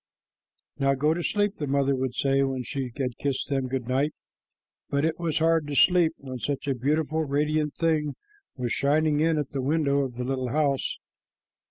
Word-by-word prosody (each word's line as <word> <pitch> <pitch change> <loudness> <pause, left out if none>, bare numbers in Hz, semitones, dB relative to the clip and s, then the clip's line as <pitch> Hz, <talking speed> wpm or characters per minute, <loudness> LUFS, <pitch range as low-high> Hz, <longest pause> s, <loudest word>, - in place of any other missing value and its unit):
"Now 135 0 +3
go 150 +4 +2
to 175 - -3
sleep," 205 +3 0
the 145 - -3
mother 140 0 +2
would 130 -1 -2
say 135 +1 +2
when 135 -2 -1
she 135 -1 -4
had 125 -4 -3
kissed 140 -2 -2
them 135 -2 0
good 130 -2 -3
night, 135 +4 0 0.7
but 140 +2 +1
it 160 0 -1
was 165 -3 -1
hard 165 -1 +3
to 145 - -4
go - - -2
to - - +5
sleep 175 -3 +5
when 130 -2 -7
such 145 +2 -3
a 140 - +2
beautiful, 155 +5 0
radiant 150 +1 0
thing 155 -3 0 0.4
was 125 -4 -3
shining 150 +1 +2
in 160 0 +2
at 145 -2 -2
the 135 - -2
window 140 0 +1
of 130 -3 -2
the 125 - -3
little 130 0 -2
house. 140 0 0
140 Hz, 200 wpm, -26 LUFS, 135-155 Hz, 0.7 s, to